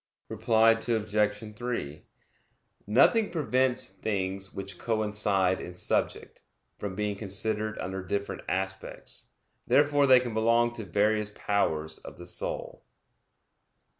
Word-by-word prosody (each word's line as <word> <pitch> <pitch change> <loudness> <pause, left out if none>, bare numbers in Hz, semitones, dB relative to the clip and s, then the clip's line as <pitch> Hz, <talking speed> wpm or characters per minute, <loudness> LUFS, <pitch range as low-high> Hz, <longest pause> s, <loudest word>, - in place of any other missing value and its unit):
Reply 115 0 +4
Obj. 105 -2 -1
3: 105 -11 -4 0.8
Nothing 205 - +4
prevents 130 - +1
things 95 -1 -3
which 95 -2 -6
coincide 105 -4 +1
in 90 - -8
subject, - - -1 0.4
from 100 -2 -4
being 105 0 -2
considered 110 +2 0
under 95 +1 -4
different 100 +2 -3
aspects; 95 +1 -4 0.4
therefore 145 -1 +4
they 130 -1 +8
can 120 -2 -4
belong 115 +2 +2
to 115 -3 -6
various 105 +2 +1
powers 80 -7 -1
of - - -11
the 90 - -10
soul. 85 - -5
105 Hz, 110 wpm, -28 LUFS, 95-115 Hz, 0.8 s, they